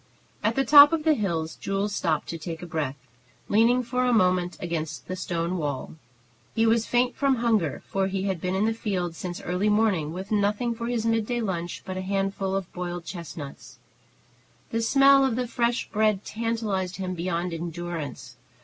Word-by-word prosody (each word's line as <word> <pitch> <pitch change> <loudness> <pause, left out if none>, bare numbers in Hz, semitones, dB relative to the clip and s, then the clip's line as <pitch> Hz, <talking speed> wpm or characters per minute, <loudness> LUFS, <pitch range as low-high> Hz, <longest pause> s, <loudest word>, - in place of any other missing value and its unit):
At 220 +2 +1
the 270 - +2
top 290 +4 +9
of 320 -2 0
the 315 0 +4
hill 170 - -1
Jules 195 +1 -1
stopped 160 -6 0
to 165 - -4
take 165 +2 -6
breath, 150 -4 -2 0.5
leaning 235 +4 +4
for 250 +1 -1
a 250 - +2
moment 180 -5 +2
against 165 -3 -4
the 185 - -3
stone 175 0 -2
wall. 145 -4 -3 0.6
He 225 - +3
was 225 0 +3
faint 245 +1 +2
from 275 -2 +2
hunger, 225 - 0
for 195 -1 0
he 190 0 -2
had 190 -4 -2
been 185 +1 -1
in 200 +3 +2
the 225 - +1
fields 180 -7 -3
since 175 -1 -5
early 180 +4 0
morning, 205 -8 +2
with 190 +4 -7
nothing 210 +3 +1
for 230 0 -5
his 235 -2 -1
midday 225 +1 +1
lunch 175 -6 -3
but 185 -1 -5
a - - -2
handful 195 0 -1
of 195 -2 -4
boiled 175 -1 -5
chestnuts. 165 -6 -8 0.9
The 230 - 0
smell 275 +3 +6
of 265 -4 +1
the 250 +1 -1
fresh 240 0 0
bread 215 -2 +1
tantalized 215 -5 -2
him 185 -1 -3
beyond 175 0 -2
endurance. 165 -7 -5
195 Hz, 180 wpm, -26 LUFS, 175-230 Hz, 0.9 s, top